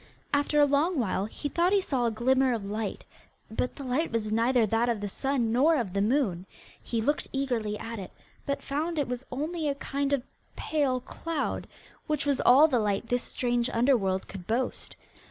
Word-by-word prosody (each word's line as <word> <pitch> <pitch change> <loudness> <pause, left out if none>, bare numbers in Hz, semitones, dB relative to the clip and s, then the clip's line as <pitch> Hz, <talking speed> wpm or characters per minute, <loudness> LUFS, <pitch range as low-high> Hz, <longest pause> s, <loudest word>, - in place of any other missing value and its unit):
After 290 +1 +2
a 290 - +7
long 295 +5 +2
while 200 -5 0
he 255 +7 -5
thought 345 +6 +2
he 405 - +5
saw 265 -10 0
a - - +3
glimmer 255 +3 +2
of 210 -3 -5
light, 210 +1 -4 0.5
but 250 +3 -2
the 280 - -7
light 270 +6 0
was 220 -2 -1
neither 230 +1 +3
that 225 +3 +1
of 230 -3 0
the 205 - -3
sun 245 +2 0
nor 285 +8 +4
of 230 -10 -2
the 200 - +1
moon. 205 -6 +1 0.3
He 230 -2 -2
looked 290 +5 0
eagerly 240 -6 -1
at 230 0 -6
it, 190 - -7 0.3
but 280 0 -3
found 315 +4 -2
it 290 - +1
was 250 +1 -5
only 305 +4 -2
a 280 - -1
kind 280 0 -2
of 280 -3 +1 0.3
pale 275 -5 0
cloud, 330 +5 -3 0.4
which 300 -2 -1
was 285 -2 +1
all 280 +6 +7
the 255 -6 +2
light 210 +1 -1
this 245 0 +1
strange 240 0 -1
underworld 230 -6 +2
could 185 -3 -9
boast. 240 +3 -2
250 Hz, 195 wpm, -28 LUFS, 225-285 Hz, 0.5 s, a